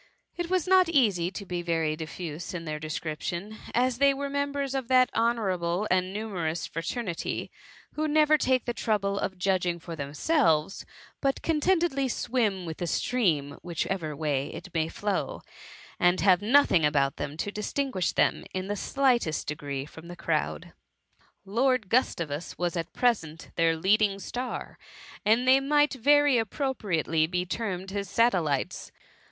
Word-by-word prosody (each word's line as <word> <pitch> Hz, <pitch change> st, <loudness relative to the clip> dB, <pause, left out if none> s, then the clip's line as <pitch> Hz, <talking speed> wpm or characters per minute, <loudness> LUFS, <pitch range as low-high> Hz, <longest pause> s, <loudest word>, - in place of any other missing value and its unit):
It 345 Hz, -1 st, -3 dB
is 370 Hz, -1 st, +1 dB
not 370 Hz, -2 st, +5 dB
easy 205 Hz, -, +2 dB
to 200 Hz, +2 st, -7 dB
be 175 Hz, -1 st, -3 dB
very 165 Hz, -3 st, 0 dB
diffuse 165 Hz, +1 st, -6 dB
in 165 Hz, -1 st, -5 dB
their 155 Hz, -1 st, -4 dB
description, 165 Hz, +6 st, -4 dB
as 250 Hz, 0 st, +1 dB
they 280 Hz, 0 st, +5 dB
were 280 Hz, 0 st, -4 dB
members 285 Hz, -1 st, -1 dB
of 265 Hz, -3 st, -2 dB
that 255 Hz, 0 st, +4 dB
honourable 200 Hz, -5 st, 0 dB
and 185 Hz, 0 st, +2 dB
numerous 175 Hz, -7 st, -3 dB
fraternity, 175 Hz, +2 st, -4 dB, 0.4 s
who 310 Hz, +1 st, -1 dB
never 305 Hz, 0 st, +4 dB
take 260 Hz, -4 st, +1 dB
the 240 Hz, -, -1 dB
trou 220 Hz, -2 st, +1 dB
ble 200 Hz, 0 st, -2 dB
of 190 Hz, -, -3 dB
judging 180 Hz, -2 st, +1 dB
for 170 Hz, 0 st, -8 dB
themselves, 155 Hz, -, +1 dB, 0.3 s
but 275 Hz, -1 st, 0 dB
content 330 Hz, +2 st, +2 dB
edly 275 Hz, -5 st, 0 dB
swim 215 Hz, -7 st, 0 dB
with 160 Hz, -1 st, -6 dB
the 175 Hz, -, -3 dB
stream, 155 Hz, -, 0 dB
whichever 170 Hz, -2 st, -3 dB
way 145 Hz, -2 st, -1 dB
it 185 Hz, -, -9 dB
may 160 Hz, -2 st, +1 dB
flow, 205 Hz, +4 st, -3 dB, 0.6 s
and 175 Hz, +1 st, +3 dB
have 190 Hz, -1 st, +5 dB
nothing 215 Hz, -, +4 dB
about 140 Hz, -2 st, +2 dB
them 145 Hz, +1 st, -5 dB
to 205 Hz, -, -3 dB
distinguish 210 Hz, -2 st, -1 dB
them -, -, +1 dB
in 185 Hz, +1 st, -3 dB
the 205 Hz, -, -1 dB
slightest 240 Hz, -, +1 dB
degree 140 Hz, -2 st, -4 dB
from 160 Hz, +3 st, -12 dB
the 175 Hz, -, -8 dB
crowd. -, -, -2 dB, 0.7 s
Lord 235 Hz, +1 st, +1 dB
Gustavus 170 Hz, -, 0 dB
was 175 Hz, -1 st, -1 dB
at 170 Hz, 0 st, -3 dB
present 165 Hz, -11 st, -1 dB
their 165 Hz, -1 st, +3 dB
leading 200 Hz, +3 st, +3 dB
star, 245 Hz, +5 st, -5 dB, 0.4 s
and 225 Hz, +4 st, +3 dB
they 260 Hz, +1 st, +7 dB
might 290 Hz, +2 st, +3 dB
very 285 Hz, 0 st, +4 dB
appropriately 195 Hz, -, 0 dB
be 180 Hz, +1 st, -1 dB
termed 190 Hz, -2 st, -4 dB
his 200 Hz, -1 st, -3 dB
satellites. 185 Hz, -, +1 dB
195 Hz, 155 wpm, -27 LUFS, 165-255 Hz, 0.7 s, they